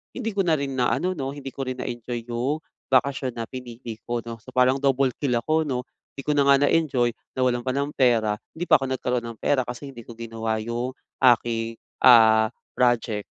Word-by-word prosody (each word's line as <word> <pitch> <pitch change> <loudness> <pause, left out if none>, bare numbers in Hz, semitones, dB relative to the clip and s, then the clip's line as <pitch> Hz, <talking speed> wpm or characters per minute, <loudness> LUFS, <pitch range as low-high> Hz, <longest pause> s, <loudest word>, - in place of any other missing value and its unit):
hindi 225 - -3
ko 195 - +1
na 160 - +4
rin 140 -1 -3
na 125 -1 +1
ano, 185 +1 0
'no, 135 -6 -4
hindi 135 -2 -7
ko 135 -1 -5
rin 130 - -4
na-enjoy 120 0 -5
'yong 135 +7 -1 0.3
bakasyon 130 -1 +2
na 115 - -3
pinili 120 -3 -8
ko,'no? 115 -1 -4
So, 130 +4 -14
parang 130 +1 +4
double 135 -1 +2
kill 140 -4 0
ako, 155 +5 +1
'no? 125 -2 -2 0.3
Hindi 135 - -6
ko - - +5
na 140 - +4
nga 140 - +7
na-enjoy, 135 -7 +2 0.3
nawalan 125 -1 +1
pa 130 - 0
ng 140 +1 0
pera, 115 -5 +3 0.2
hindi 165 - -4
pa - - +8
ako 135 - -2
nagkaro'n 125 -2 -1
ng 110 - -22
pera 130 -3 +2
kasi 125 +3 -6
hindi 120 -4 -11
ko 120 - -8
ginawa 115 -1 -3
'yong 120 +3 -3 0.3
aking, 115 -1 +2 0.3
ah, 110 -3 +7 0.3
project. 115 -4 +1
125 Hz, 200 wpm, -24 LUFS, 115-135 Hz, 0.3 s, pa